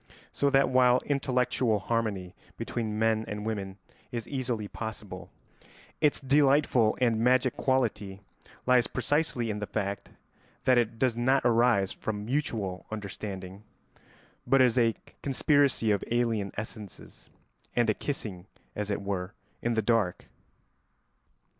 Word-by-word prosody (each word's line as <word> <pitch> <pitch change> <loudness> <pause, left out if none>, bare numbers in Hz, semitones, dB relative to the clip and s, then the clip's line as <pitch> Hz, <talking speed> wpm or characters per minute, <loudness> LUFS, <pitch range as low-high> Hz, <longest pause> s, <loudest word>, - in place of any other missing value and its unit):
So 140 - +1
that 135 -1 +4
while 125 -1 +5
intellectual 130 -4 +1
harmony 100 -4 -2 0.2
between 110 -3 -3
men 110 0 +2
and 105 +2 -5
women 100 -3 -4 0.3
is 120 -2 -4
easily 125 -6 -2
possible, 105 -4 -7 0.7
its 150 -2 +3
delightful 135 -4 +3
and 115 -3 +2
magic 125 +1 +3
quality 105 -7 0 0.5
lies 125 -1 +4
precisely 125 -3 0
in 105 - -4
the 105 - -4
fact 100 -2 -3 0.5
that 125 -1 +5
it 115 -1 -1
does 125 -1 +1
not 130 +3 +2
arise 115 -5 +3
from 105 -1 -4
mutual 110 -8 -2
understanding, 100 -2 -6 0.9
but 135 - +4
is 125 -3 +5
a 115 -3 +3 0.3
conspiracy 140 -4 +2
of 100 - +1
alien 115 -5 0
essences 105 - -8 0.5
and 120 -1 +3
a 110 - +3
kissing, 100 -9 -5 0.3
as 105 0 -3
it 100 0 -2
were, 100 0 -3 0.3
in 120 0 0
the 110 - +1
dark. 105 -5 +1
115 Hz, 130 wpm, -28 LUFS, 105-125 Hz, 0.9 s, while